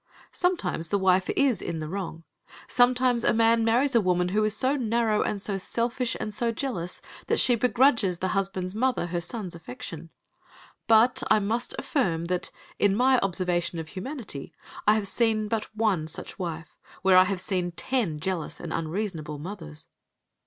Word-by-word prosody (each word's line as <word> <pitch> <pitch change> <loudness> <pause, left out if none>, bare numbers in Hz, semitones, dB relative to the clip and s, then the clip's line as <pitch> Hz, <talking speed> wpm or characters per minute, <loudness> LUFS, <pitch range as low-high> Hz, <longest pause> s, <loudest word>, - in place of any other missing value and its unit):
Sometimes 355 - 0
the 200 - +2
wife 185 -1 +2
is 265 -8 +3
in 170 - -4
the 155 -1 -4
wrong. 165 -2 -5 0.4
Sometimes 245 -1 +3
a - - +3
man 230 0 +4
marries 245 +5 +2
a 230 - +5
woman 180 -2 +1
who 210 +3 +1
is 215 0 +1
so 260 +5 +2
narrow 230 -4 +1
and 205 - -1
so 195 0 -2
selfish 235 +4 -1
and 215 - -4
so 230 +2 0
jealous 210 -9 -3 0.2
that - - +1
she 250 - +6
begrudges 235 -5 +3
the 185 +2 -2
husband's 190 -2 -1
mother 250 -3 0
her 175 0 -3
son's 190 0 -5
affection. 165 +1 -8 0.8
But 230 +3 +5
I - - +6
must 220 +4 -1
affirm 170 - 0
that, 180 +1 -1 0.3
in 200 -1 +3
my 255 +2 +4
observation 180 -2 -1
of 160 -1 -6
humanity, 210 - -6 0.3
I 210 - +6
have 210 -2 -1
seen 220 -1 +1
but 220 0 -1
one 200 -8 +1
such 160 - -7
wife, 165 -3 -5 0.3
where 190 -1 +5
I 185 0 +8
have 190 0 -2
seen 180 -2 -1
ten 195 -8 -1
jealous 175 -1 -3
and 165 - -5
unreasonable 165 -3 -3
mothers. 150 - -8
200 Hz, 170 wpm, -26 LUFS, 175-230 Hz, 0.8 s, I